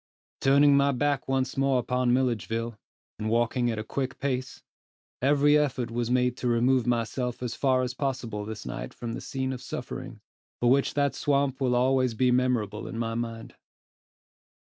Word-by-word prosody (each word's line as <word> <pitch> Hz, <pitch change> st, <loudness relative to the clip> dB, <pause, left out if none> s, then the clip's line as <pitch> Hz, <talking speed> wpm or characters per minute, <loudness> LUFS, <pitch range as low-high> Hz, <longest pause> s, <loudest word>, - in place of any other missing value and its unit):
Turning 140 Hz, +1 st, +5 dB
my 140 Hz, 0 st, +4 dB
back 140 Hz, +1 st, 0 dB
once 135 Hz, -1 st, 0 dB
more 135 Hz, -1 st, +2 dB
upon 125 Hz, 0 st, +1 dB
Milledgeville, 115 Hz, -2 st, 0 dB, 0.4 s
and 110 Hz, 0 st, -2 dB
walking 120 Hz, +2 st, +1 dB
at 115 Hz, -, -2 dB
a 110 Hz, -, -3 dB
quick 130 Hz, +3 st, -3 dB
pace, 130 Hz, -1 st, -3 dB, 0.6 s
every 145 Hz, +2 st, +4 dB
effort 135 Hz, -5 st, 0 dB
was 120 Hz, 0 st, -2 dB
made 125 Hz, -1 st, +2 dB
to 125 Hz, -, -2 dB
remove 120 Hz, +1 st, +2 dB
myself 120 Hz, +1 st, -1 dB
as 120 Hz, -2 st, -2 dB
far 130 Hz, -2 st, +2 dB
as 125 Hz, 0 st, -3 dB
possible 130 Hz, -6 st, -3 dB
this 110 Hz, 0 st, -7 dB
night 60 Hz, -, -6 dB
from 115 Hz, -1 st, -5 dB
the -, -, -5 dB
scene 130 Hz, -1 st, -3 dB
of 125 Hz, -, -7 dB
suffering, -, -, -6 dB, 0.4 s
for 120 Hz, 0 st, +3 dB
which 135 Hz, +1 st, +2 dB
that 140 Hz, -1 st, +2 dB
swamp 140 Hz, -1 st, 0 dB
will 130 Hz, -, +2 dB
be 125 Hz, -, +2 dB
always 130 Hz, -2 st, +2 dB
memorable 125 Hz, -4 st, +1 dB
in -, -, -6 dB
my 115 Hz, -1 st, -2 dB
mind. 115 Hz, -1 st, -5 dB
125 Hz, 170 wpm, -27 LUFS, 115-135 Hz, 0.6 s, Turning